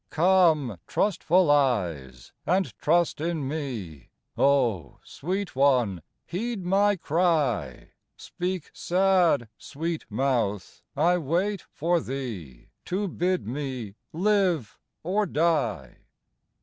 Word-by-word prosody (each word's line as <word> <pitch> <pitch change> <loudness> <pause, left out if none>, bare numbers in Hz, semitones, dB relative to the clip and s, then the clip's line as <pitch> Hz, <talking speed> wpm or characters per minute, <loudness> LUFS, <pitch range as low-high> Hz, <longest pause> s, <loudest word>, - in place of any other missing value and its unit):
Come, 160 - +3
trustful 180 -4 +2
eyes, 85 - 0
and 180 - 0
trust 170 -1 +2
in 160 -4 -2
me, 120 - -5 0.3
O 120 - +1
sweet 185 +2 -4
one, 125 - +2 0.2
heed 215 +1 -4
my 200 +3 +3
cry; 150 - 0 0.3
Speak 180 -1 -4
sad, 180 -8 +2
sweet 165 +2 -4
mouth, 110 -5 -1 0.2
I 175 +4 +3
wait 175 +6 -1
for 170 +3 +1
thee 115 - -7 0.2
To 200 +3 -1
bid 180 +1 -1
me 130 -4 -5 0.2
live 180 - +1 0.2
or 200 +5 0
die. 145 - 0
155 Hz, 95 wpm, -26 LUFS, 120-180 Hz, 0.3 s, Come